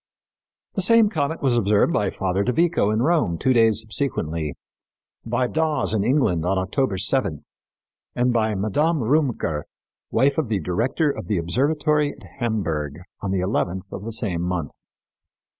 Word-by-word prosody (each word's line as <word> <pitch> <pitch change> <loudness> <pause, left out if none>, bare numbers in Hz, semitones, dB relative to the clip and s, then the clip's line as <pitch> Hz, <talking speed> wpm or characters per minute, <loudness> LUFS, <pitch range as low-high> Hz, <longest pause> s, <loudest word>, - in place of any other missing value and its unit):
The 195 - -1
same 225 +2 +5
comet 160 -5 -2
was 130 -3 +3
observed 105 -2 +3
by 105 -2 +1
Father 95 0 -1
de 125 - +1
Vico 165 -6 +2
in 110 +2 +1
Rome 150 - +2
two 130 +9 +2
days 115 -2 +4
subsequently, 85 - -2 0.7
by 120 +2 0
Dawes 155 -1 0
in 105 -3 +1
England 125 - +2
on 95 +3 0
October 95 +3 0
seventh, 95 - 0 0.7
and 125 0 +2
by 110 -2 +1
Madame 145 - +1
Rümker, 120 - 0 0.5
wife 140 +4 +2
of 145 -8 -2
the 105 -3 0
director 120 - 0
of - - -7
the 105 - 0
observatory 145 - +1
of 125 - -17 0.2
Hamburg, 80 - -2 0.3
on 100 - -3
the 95 -1 0
eleventh 95 -1 -1
of 95 - -6
the 115 - -5
same 100 -6 -2
month. 90 -4 -2
110 Hz, 160 wpm, -23 LUFS, 95-140 Hz, 0.7 s, same